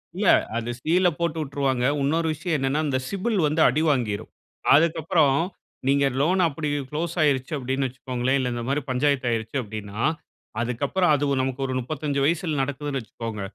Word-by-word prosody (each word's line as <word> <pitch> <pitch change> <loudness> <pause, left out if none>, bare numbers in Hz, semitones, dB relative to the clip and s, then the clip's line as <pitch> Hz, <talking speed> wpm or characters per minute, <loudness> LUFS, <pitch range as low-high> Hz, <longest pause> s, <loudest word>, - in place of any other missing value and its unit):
இல்ல, - - 0 0.3
அது 120 0 -3
சீல 180 +5 +3
போட்டு 170 -1 -1
உட்ருவாங்க. 135 -3 -1 0.2
உன்னொரு 160 +4 +1
விஷயம் 160 +2 -2
என்னனா, 135 +3 0
அந்த 135 -3 0
சிபில் 200 +2 -1
வந்து 155 +2 +1
அடிவாங்கிரும். 125 -8 0 0.5
அதுக்கப்பறம் 155 -2 +3 0.5
நீங்க 140 0 +3 0.2
லோன் 180 +6 +2
அப்டி 150 0 -3 0.2
குளோஸ் 165 +3 -2
ஆயிருச்சி 140 -1 +1
அப்டினு 135 0 -1
வச்சுக்கோங்களே, 130 0 -2
இல்ல 125 -2 -1
இந்த 120 0 -4
மாரி 140 +2 0
பஞ்சாயத்து 130 0 +1
ஆயிருச்சி 115 +3 -2
அப்டினா, 105 -1 -7 0.6
அதுக்கப்பறம் 140 +8 +1
அது 145 - 0 0.2
நமக்கு 130 +1 -2
ஒரு 130 - -3
35 140 +2 -2
வயசுல 160 -1 0
நடக்குதுனு 140 +1 -2
வச்சுக்கோங்க. 115 -1 -6
140 Hz, 150 wpm, -24 LUFS, 130-155 Hz, 0.6 s, சீல